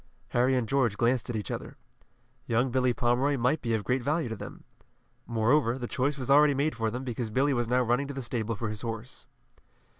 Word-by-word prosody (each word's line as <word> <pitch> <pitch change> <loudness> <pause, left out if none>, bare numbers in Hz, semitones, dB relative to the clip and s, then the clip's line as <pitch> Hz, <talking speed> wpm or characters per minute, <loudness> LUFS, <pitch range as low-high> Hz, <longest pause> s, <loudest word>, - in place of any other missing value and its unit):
Harry 125 +2 +2
and 125 -3 0
George 120 -5 +1
glanced 120 +1 +1
at 120 - -2
each 105 -4 -4
other. - - -6 0.7
Young 120 +2 +1
Billy 130 0 +2
Pomeroy 130 +3 +1
might 125 +6 +1
be 115 -2 0
of 105 - -2
great 125 +6 0
value 145 +1 0
to 110 - -3
them. - - -9 0.6
Moreover, 120 +2 +2
the 125 - -4
choice 140 +4 -1
was 130 0 -2
already 145 0 +6
made 145 +3 0
for 115 -1 -1
them, 125 +4 -5
because 120 -2 -3
Billy 135 +6 +2
was 120 -2 0
now 125 +1 +2
running 125 +4 +1
to 140 - -5
the 135 - -4
stable 115 -2 -2
for 110 +2 -3
his 105 -1 -5
horse. 115 +1 -6
125 Hz, 215 wpm, -28 LUFS, 115-135 Hz, 0.7 s, already